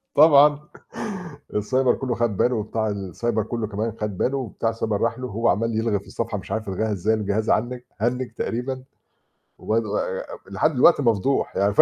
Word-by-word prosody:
طبعًا 145 -1 +7 1.0
السايبر 125 +5 +2
كله 125 -3 -2
خَد 115 -4 0
باله 125 +6 +2
وبتاع 110 +1 -1
السايبر 105 +3 -2
كله 110 +1 -3
كمان 110 +2 -2
خَد 105 -3 -3
باله، 135 - +1
وبتاع 115 -2 -2
السايبر 110 -2 -2
راح 115 +1 0
له 130 - -4
وهو 115 +1 0
عَمَّال 115 0 +1
يلغي 110 -3 +1
في - - -19
الصفحة 115 -2 -3
مش 95 - -8
عارف 110 -2 -2
يلغيها 110 +3 -1
إزاي، 105 +3 +1
الجهاز 110 0 -1
هنِّج 125 +1 -1
تقريبًا 130 +2 -3 0.7
و 110 - -1 0.8
لحد 135 +10 +1
دلوقتي 145 +5 +6
مفضوح 120 +2 +1
يعني 100 +1 +2
ف - - +7
115 Hz, 170 wpm, -23 LUFS, 105-125 Hz, 1.0 s, طبعًا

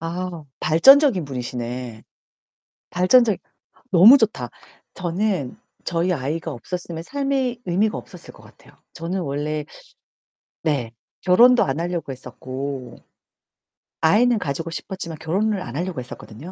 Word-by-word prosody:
아, 170 0 -5 0.2
발전적인 220 - +6
분이시네. 125 -3 -5 0.9
발전적 205 +3 +4 0.5
너무 200 +10 +9
좋다. 200 - -1 0.4
저는 180 -5 -2 0.3
저희 170 +2 0
아이가 155 +2 -3
없었으면 170 +5 -6
삶의 270 -1 -1
의미가 200 +5 +1
없었을 - - -11
것 - - -17
같아요. - - -19 0.2
저는 175 +3 -3
원래 150 0 -3 1.0
네, 135 -8 -1 0.3
결혼도 240 +7 +6
안 135 +3 -2
하려고 170 -4 -3
했었고 130 0 -7 1.1
아이는 230 +9 +4
가지고 160 -1 -3
싶었지만 170 -2 -6
결혼을 195 +5 0
안 120 -4 -7
하려고 175 -1 -3
했었거든요. 120 +5 -10
170 Hz, 275 characters per minute, -22 LUFS, 140-195 Hz, 1.1 s, 너무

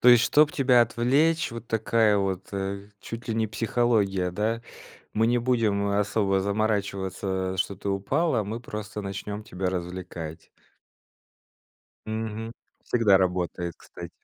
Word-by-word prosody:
То 125 - +6
есть, 120 -1 +8
чтоб 150 +3 +5
тебя 130 -3 +4
отвлечь, 135 +9 +2
вот 115 0 -8
такая 110 -1 +2
вот, 95 -1 -2
э, 100 +1 -4
чуть 115 +1 -8
ли 110 - 0
не 110 -1 +1
психология, 105 -5 +1
да? 110 +5 -1 0.5
Мы 110 +1 +3
не 120 - +3
будем, 115 -5 +1
э, 100 - +1
особо 100 -2 +1
заморачиваться, 95 -2 -1
что 95 +1 -1
ты 100 - -5
упала, 120 - +1
мы 110 +4 -4
просто 105 -3 -6
начнем 100 +2 -5
тебя 95 -2 -3
развлекать. 90 -3 -6 1.6
Мгм, 110 +1 -4 0.3
всегда 105 -5 +4
работает, 90 -2 -1
кстати. - - -10
105 Hz, 135 wpm, -26 LUFS, 95-115 Hz, 1.6 s, есть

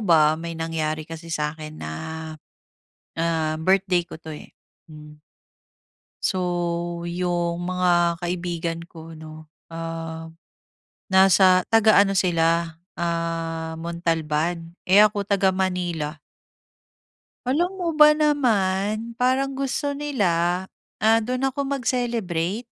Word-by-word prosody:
ba 155 -4 +5
may 165 +1 -6
nangyari 155 -1 -2
kasi 165 +1 -8
sa'kin 155 0 -4
na, 75 - -5 1.3
ah, 165 -1 0
birthday 185 0 +2
ko - - -10
'to, 160 - -9
eh. 150 - -11 0.4
Hmm. 150 -1 -12 1.1
So 185 - +1 0.6
yung 175 0 -2
mga 175 -2 +2
kaibigan 170 -1 -3
ko 165 -1 -11
'no, 155 0 -11 0.2
ah, 165 0 -6 0.8
nasa 190 -1 +5
taga-ano 215 -3 +5
sila, 165 -2 +1 0.2
ah, 165 -1 -3
Montalban 165 0 -2 0.2
eh, 195 +3 +7
ako 205 -1 +1
taga-Manila. 180 -5 0 1.3
Alam 345 +9 0
mo 355 -2 -2
ba 300 -1 +7
naman, 220 -7 +1
parang 260 +2 +2
gusto 275 +2 -2
nila, 185 -12 0 0.3
ah, 225 +1 +4
doon 255 +4 -1
ako 280 - -4 0.2
mag-celebrate. 230 -7 -1
175 Hz, 100 wpm, -23 LUFS, 165-205 Hz, 1.3 s, eh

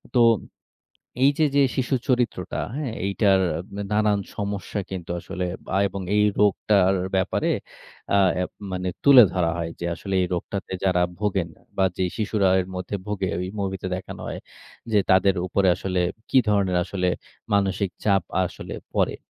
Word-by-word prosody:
তো 120 - +5 1.0
এইযে 145 +3 +4
যে 140 - +6
শিশুর 130 -1 0
চরিত্রটা, 120 -8 0 0.2
হ্যাঁ? 145 -6 -3
এইটার 100 -1 +3 0.4
দা 100 - -3
নানান 105 -1 +2 0.2
সমস্যা 100 0 -3
কিন্তু 90 -3 -6
আসলে 90 +2 -4 0.2
বা - - -4
এবং 100 +1 -6
এই 105 - +4
রোগটার 100 -2 +3 0.2
ব্যাপারে 95 - 0 0.6
অ্যাঁ 100 -2 +5 0.4
মানে 90 0 -2 0.2
তুলে 140 -3 +10
ধরা 85 -3 +1
হয় 85 -1 -3
যে, 85 - -4
আসলে 95 +3 -5
এই - - +1
রোগটাতে 95 +3 -4
যারা 90 -2 +3 0.2
ভোগেন 95 -5 0 0.3
বা, 95 - +3
যে 95 - 0
শিশুরা 105 -2 +1
এর 90 - -4
মধ্যে 90 +2 -3
ভোগে, 100 -2 -2
ঐ - - -2 0.2
মুভিতে 95 -1 -3
দেখানো 95 - -8
হয়। - - -5 0.5
যে 105 - +5
তাদের 95 +1 +5
উপরে 95 +1 +2
আসলে 95 -1 -2 0.3
কি 135 - +5
ধরনের 100 -3 +2
আসলে 90 -2 -1 0.5
মানসিক 100 -1 +1
চাপ 100 -3 +3 0.2
আসলে 90 - -7 0.2
পড়ে। - - +1
100 Hz, 150 wpm, -24 LUFS, 95-105 Hz, 1.0 s, তুলে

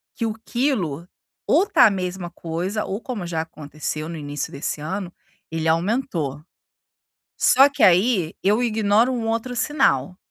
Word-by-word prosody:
que 230 - -2
o 220 - -1
quilo 185 - -1 0.4
ou 395 - +4
tá 270 -10 +6
a 220 - +5
mesma 180 -2 -4
coisa 175 +6 -3
ou 195 - -3
como 220 -10 -5
já 165 -2 -1
aconteceu 155 0 -6
no 170 - -6
início 145 -1 -5
desse 140 +1 -4
ano, 180 +3 -4 0.4
ele 160 0 -2
aumentou. 165 - -1 1.1
Só 270 +2 +8
que 280 - -3
aí 185 -2 +4
eu 210 +5 +3
ignoro 220 +1 +2
um 235 -3 -2
outro 230 +2 -2
sinal. 220 - +1
190 Hz, 150 wpm, -22 LUFS, 160-230 Hz, 1.1 s, Só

